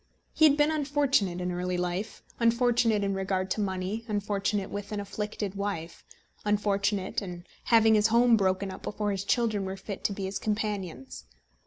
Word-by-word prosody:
He 315 - +5
had 295 -1 +5
been 295 +1 +4
unfortunate 280 - +1
in 180 0 -2
early 180 0 -2
life 180 +4 -3 0.2
unfortunate 230 -2 +3
in 195 0 0
regard 190 -1 -1
to 215 - 0
money 190 +3 -2
unfortunate 205 -1 -1
with 205 0 -5
an 210 - -2
afflicted 205 0 -4
wife 195 -5 -4 0.4
unfortunate 205 0 0
in 175 -3 -7 0.2
having 225 -1 +5
his 210 0 +5
home 235 +1 +5
broken 190 -1 +1
up 190 - -9
before 210 0 -2
his 195 -1 -2
children 215 -2 +1
were 190 0 -4
fit 195 0 -7
to - - +2
be 195 -1 -4
his 190 +1 -3
companions. 205 - -3
205 Hz, 170 wpm, -28 LUFS, 190-220 Hz, 0.4 s, He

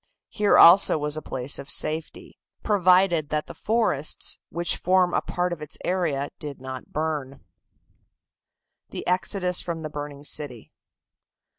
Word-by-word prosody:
Here 210 -1 +2
also 170 0 +8
was 150 0 -2
a 155 - -5
place 130 0 -4
of 140 - -9
safety, 155 +2 -2 0.2
provided 180 -5 +3
that 150 0 -1
the - - -10
forests 215 -10 -1
which 170 +1 0
form 180 0 +2
a - - +1
part 180 0 -2
of 160 - -8
its 150 - -6
area 160 -7 -1
did 145 -2 -7
not 130 0 -8
burn. 150 -3 -3 1.5
THE - - -6
EXODUS 180 0 +1
FROM 170 -3 -5
THE 155 - -6
BURNING 145 -1 -7
CITY. 140 -6 -6
155 Hz, 140 wpm, -24 LUFS, 145-180 Hz, 1.5 s, also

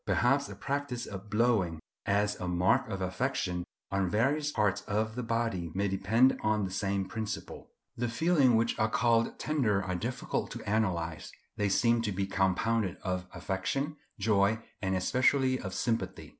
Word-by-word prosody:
Perhaps 135 +3 +2
the - - -8
practice 140 -3 -3
of 100 +1 -8
blowing, 105 -7 +2 0.3
as 105 +1 +2
a 90 - -3
mark 95 +9 +2
of 100 -2 -4
affection, 90 -2 -1 0.3
on 95 -2 +1
various 145 +9 +1
parts 105 -6 +1
of 110 +1 0
the 125 - -3
body 115 -7 -1
may 100 +1 +1
depend 105 +7 +3
on 105 -1 +1
the 95 - -5
same 95 0 -1
principle. 105 -1 -5 0.3
The 120 0 -1
feelings 140 -1 +3
which 115 +1 +1
are 110 - +2
called 115 0 +2
tender 115 -10 +1
are 95 - -2
difficult 115 +8 -2
to - - -8
analyse; 90 -7 -1 0.2
they 105 -1 0
seem 115 +4 +3
to 110 -2 -1
be 95 +1 -1
compounded 95 +1 +1
of 90 -1 -2
affection, 95 - -2 0.2
joy, 105 +1 +2 0.2
and 95 -1 0
especially 130 +6 +2
of 95 - -5
sympathy. 115 -1 -2
105 Hz, 160 wpm, -30 LUFS, 95-120 Hz, 0.3 s, depend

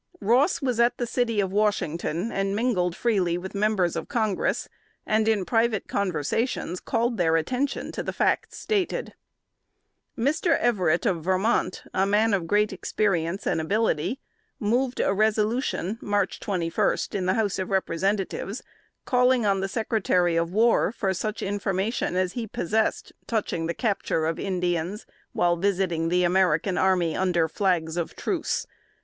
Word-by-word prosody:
Ross 250 - +2
was 250 -3 0
at 235 +1 +3
the 240 - -1
city 235 -2 0
of 190 -2 0
Washington, 190 -2 0
and 195 0 -1
mingled 195 -7 0
freely 190 -8 +1
with 190 +2 -7
members 200 -4 +1
of - - -4
Congress, 220 -7 0 0.4
and 215 0 +1
in 210 -4 +2
private 225 -1 +1
conversations 185 - -1
called 235 0 -1
their 165 -3 +2
attention 250 - -1
to - - -4
the - - -3
facts - - 0
stated. 405 -4 -1 1.0
Mr. 300 +8 +2
Everett, 185 -8 +1
of 175 -7 0
Vermont, 190 +3 0
a 190 +1 +2
man 210 +2 +3
of 180 -4 0
great 210 +2 +2
experience 190 -2 -1
and 160 - +1
ability, 215 - 0 0.4
moved 245 +3 0
a - - +2
resolution 215 0 0
(March 205 -2 -1
21) 185 +1 0
in 185 -2 -2
the 185 - +2
House 205 -4 0
of 185 - -3
Representatives, 195 +3 -1 0.4
calling 250 -2 +3
on 195 -1 +2
the 195 - -1
Secretary 195 -5 +1
of 165 0 0
War 225 +2 +3
for 195 -4 -1
such 215 +3 -3
information 195 0 -1
as 185 0 0
he 235 -2 -4
possessed 215 +3 -1
touching 200 -7 -1
the 170 - -2
capture 200 -8 0
of 160 0 -1
Indians, 180 +1 -2 0.3
while 175 0 +2
visiting 175 -3 0
the 180 +1 +2
American 180 0 +2
army 180 -4 +2
under 175 -3 +1
flags 170 -2 0
of 170 - -3
truce. - - -2
195 Hz, 150 wpm, -25 LUFS, 180-225 Hz, 1.0 s, at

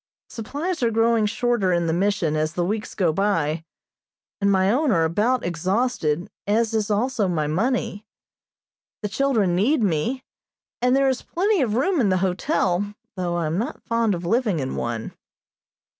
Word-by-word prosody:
Supplies 290 +9 -4
are 235 - +3
growing 225 -1 +2
shorter 235 -3 +1
in 170 -1 +1
the 160 - 0
Mission 185 -3 +1
as 155 +1 -1
the 175 0 0
weeks 210 +3 -3
go 175 -6 +2
by, 165 -5 0 0.8
and 200 0 +3
my 190 0 +3
own 285 +5 +2
are 165 -5 +3
about 215 +10 +1
exhausted, 180 -1 0 0.2
as 225 +2 +1
is 220 -2 0
also 220 0 +1
my 165 -4 0
money. 210 - -1 1.0
The 210 - -1
children 215 -6 +1
need 230 - +2
me, 210 - 0 0.6
and 250 +1 +3
there 275 0 +3
is 260 -1 0
plenty 390 +1 0
of 225 -5 0
room 340 +5 +2
in 210 - +2
the 185 - +2
hotel, 190 - 0 0.2
though 175 -2 -2
I 170 -1 -1
am 160 +4 -1
not 250 +8 -4
fond 230 -3 +1
of 170 0 -6
living 220 -1 +1
in 130 -1 -3
one. 115 -1 -4
205 Hz, 170 wpm, -23 LUFS, 175-240 Hz, 1.0 s, are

